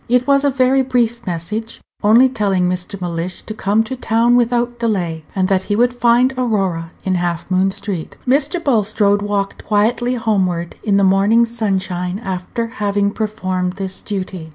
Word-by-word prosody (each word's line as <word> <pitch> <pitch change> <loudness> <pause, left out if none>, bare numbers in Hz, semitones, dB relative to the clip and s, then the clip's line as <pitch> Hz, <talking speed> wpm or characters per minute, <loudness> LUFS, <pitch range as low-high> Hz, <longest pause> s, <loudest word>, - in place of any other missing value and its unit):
It 250 +1 +3
was 280 0 +3
a 285 - +3
very 265 0 +3
brief 240 -3 0
message, 210 +7 -4 0.2
only 230 +5 +6
telling 195 -7 0
Mr. 180 +2 -3
Mellish 175 0 -4
to 215 - -6
come 215 +1 +1
to 260 +4 -5
town 235 0 +2
without 240 0 +1
delay, 180 -9 -1
and 190 -1 +1
that 190 -1 +2
he 205 - +2
would 245 +3 +2
find 245 +2 +3
Aurora 195 -9 -1
in 190 - 0
Half 175 0 -2
Moon 185 +1 +3
street. 190 -4 -5
Mr. 285 +6 +2
Bulstrode 210 -5 +2
walked 205 -1 -2
quietly 235 +4 +1
homeward 190 -7 -1
in 205 -3 +1
the 200 - +3
morning 200 +5 +4
sunshine 190 -5 -2
after 190 +2 -4 0.2
having 200 0 +1
performed 185 -4 -2
this 190 -1 -5
duty. 185 -5 -5
205 Hz, 165 wpm, -18 LUFS, 185-235 Hz, 0.2 s, only